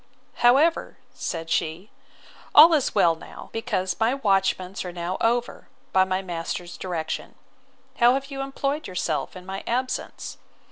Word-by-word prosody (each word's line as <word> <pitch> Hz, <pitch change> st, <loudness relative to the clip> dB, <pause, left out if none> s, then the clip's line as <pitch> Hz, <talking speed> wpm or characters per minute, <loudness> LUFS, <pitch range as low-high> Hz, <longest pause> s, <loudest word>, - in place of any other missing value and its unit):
—However, 275 Hz, +8 st, +3 dB, 0.2 s
said 165 Hz, -1 st, -5 dB
she, 170 Hz, +5 st, -1 dB, 0.6 s
all 325 Hz, +3 st, +10 dB
is 295 Hz, -5 st, +1 dB
well 170 Hz, -, +5 dB
now; 165 Hz, -, -11 dB
because 185 Hz, -5 st, -1 dB
my 230 Hz, +4 st, +2 dB
watchments 195 Hz, -5 st, 0 dB
are 180 Hz, -, -5 dB
now 175 Hz, +1 st, -3 dB
over, 240 Hz, +1 st, 0 dB, 0.3 s
by 190 Hz, 0 st, +5 dB
my 185 Hz, 0 st, -1 dB
master's 175 Hz, 0 st, -5 dB
direction. 170 Hz, -4 st, -4 dB, 0.6 s
How 240 Hz, +1 st, +5 dB
have 275 Hz, +1 st, -4 dB
you 270 Hz, 0 st, -4 dB
employed 275 Hz, +2 st, -2 dB
yourself 180 Hz, -4 st, -2 dB
in 180 Hz, 0 st, -10 dB
my 190 Hz, +1 st, -6 dB
absence? 255 Hz, +2 st, -3 dB
190 Hz, 140 wpm, -25 LUFS, 180-255 Hz, 0.6 s, all